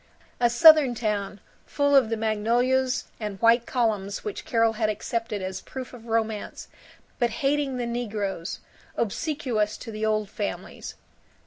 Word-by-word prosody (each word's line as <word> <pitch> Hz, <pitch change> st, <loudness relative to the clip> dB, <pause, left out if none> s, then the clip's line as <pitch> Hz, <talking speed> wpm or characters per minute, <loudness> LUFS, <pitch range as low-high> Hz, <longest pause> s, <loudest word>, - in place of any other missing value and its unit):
A 240 Hz, -1 st, +4 dB
Southern 300 Hz, 0 st, +7 dB
town, 210 Hz, -3 st, -2 dB, 0.3 s
full 285 Hz, -1 st, +2 dB
of 260 Hz, -5 st, +5 dB
the 225 Hz, -, -1 dB
magnolias 240 Hz, +4 st, +1 dB
and 210 Hz, -3 st, -5 dB
white 230 Hz, +1 st, +4 dB
columns 210 Hz, -5 st, -1 dB
which 420 Hz, -2 st, -5 dB
Carol 230 Hz, -6 st, +2 dB
had 215 Hz, -1 st, 0 dB
accepted 215 Hz, -1 st, -3 dB
as 185 Hz, 0 st, -4 dB
proof 260 Hz, -1 st, -8 dB
of 235 Hz, -1 st, -12 dB
romance, 220 Hz, -2 st, -2 dB, 0.5 s
but 240 Hz, -2 st, +2 dB, 0.2 s
hating 280 Hz, -2 st, +1 dB
the 245 Hz, -, -2 dB
negroes, 210 Hz, -7 st, -3 dB, 0.4 s
obsequious 235 Hz, -3 st, -1 dB
to 230 Hz, -, -8 dB
the 215 Hz, 0 st, -5 dB
Old 215 Hz, -1 st, +1 dB
Families. 205 Hz, 0 st, -6 dB
230 Hz, 140 wpm, -26 LUFS, 215-255 Hz, 0.5 s, Southern